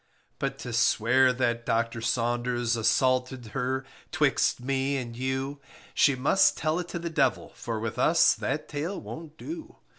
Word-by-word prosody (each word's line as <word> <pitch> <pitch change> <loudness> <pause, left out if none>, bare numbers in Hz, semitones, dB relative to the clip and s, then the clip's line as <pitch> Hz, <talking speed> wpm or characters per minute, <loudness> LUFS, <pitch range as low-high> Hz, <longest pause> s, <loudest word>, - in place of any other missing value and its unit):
But - - -2
to 120 - -5
swear 120 +2 +4
that 120 -2 -1
Docter 115 0 -1
Saunders 120 0 0
Assaulted 130 +2 +1
her, 130 0 -1 0.3
'twixt - - +2
me 135 +2 -1
and 120 -3 -5
you, 130 +3 -3 0.3
She 140 - +4
must 140 +9 +3
tell 155 +2 0
it 175 - -4
to 175 - -5
the 170 0 -4
devil, 140 -5 +1
For 115 -2 -4
with 110 0 -4
us - - +5
that - - -3
tale 160 +7 -4
won't 160 -1 -9
do. 325 +1 -8
130 Hz, 155 wpm, -27 LUFS, 120-145 Hz, 0.3 s, us